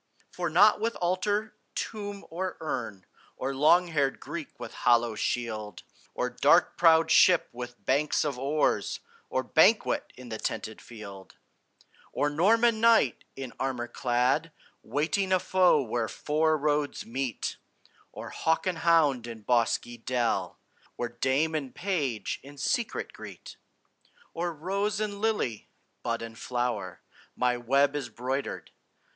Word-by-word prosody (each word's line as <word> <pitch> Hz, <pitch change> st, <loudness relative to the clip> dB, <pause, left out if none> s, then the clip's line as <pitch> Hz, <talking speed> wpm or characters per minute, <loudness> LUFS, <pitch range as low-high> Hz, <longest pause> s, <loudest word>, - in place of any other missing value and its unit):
For 175 Hz, -1 st, -2 dB
not 205 Hz, +7 st, +6 dB
with 230 Hz, +1 st, 0 dB
altar, 205 Hz, +5 st, -1 dB, 0.2 s
tomb, 205 Hz, -2 st, -5 dB
or 185 Hz, +2 st, -3 dB
urn, 115 Hz, -11 st, -4 dB, 0.3 s
Or 135 Hz, +1 st, -2 dB
long 170 Hz, +6 st, +4 dB
haired 140 Hz, -4 st, 0 dB
Greek 170 Hz, -4 st, -7 dB
with 120 Hz, -2 st, -7 dB
hollow 120 Hz, -1 st, +3 dB
shield, 110 Hz, -4 st, -3 dB, 0.3 s
Or -, -, 0 dB
dark -, -, +3 dB
prowed 165 Hz, -1 st, +5 dB
ship 180 Hz, -3 st, +5 dB
with 120 Hz, 0 st, -9 dB
banks 145 Hz, +3 st, +2 dB
of 140 Hz, -4 st, -2 dB
oars, 145 Hz, +3 st, 0 dB, 0.3 s
Or -, -, 0 dB
banquet -, -, +3 dB
in 125 Hz, -1 st, -10 dB
the 110 Hz, -1 st, -5 dB
tented 110 Hz, -1 st, -4 dB
field; 100 Hz, -4 st, -11 dB, 0.8 s
Or 145 Hz, -, +1 dB
Norman 220 Hz, +8 st, +3 dB
knight 225 Hz, -, +4 dB
in 135 Hz, -2 st, -7 dB
armor 130 Hz, -3 st, -2 dB
clad, 125 Hz, +6 st, 0 dB, 0.3 s
Waiting 185 Hz, +6 st, -1 dB
a 185 Hz, -, +4 dB
foe 180 Hz, -6 st, +3 dB
where 115 Hz, -1 st, -2 dB
four 155 Hz, +4 st, +1 dB
roads 150 Hz, 0 st, -1 dB
meet; 125 Hz, 0 st, -3 dB, 0.5 s
Or -, -, -8 dB
hawk 160 Hz, 0 st, 0 dB
and 180 Hz, -3 st, -1 dB
hound 150 Hz, -8 st, +3 dB
in 115 Hz, -2 st, -8 dB
bosky 120 Hz, 0 st, +1 dB
dell, 125 Hz, -3 st, -1 dB, 0.4 s
Where 120 Hz, -, -3 dB
dame 135 Hz, +6 st, 0 dB
and 140 Hz, -5 st, -3 dB
page 145 Hz, -, -2 dB
in 145 Hz, +1 st, -13 dB
secret 230 Hz, -, -1 dB
greet; -, -, -10 dB, 0.8 s
Or 170 Hz, +1 st, -2 dB
rose 195 Hz, +6 st, -2 dB
and 205 Hz, -2 st, -3 dB
lily, 210 Hz, -, -1 dB, 0.3 s
bud 115 Hz, -1 st, -2 dB
and 115 Hz, 0 st, -9 dB
flower, 120 Hz, -7 st, -3 dB, 0.3 s
My 125 Hz, 0 st, +1 dB
web 135 Hz, +4 st, +2 dB
is 140 Hz, -4 st, -3 dB
broidered. 130 Hz, +3 st, -4 dB
140 Hz, 135 wpm, -28 LUFS, 120-175 Hz, 0.8 s, not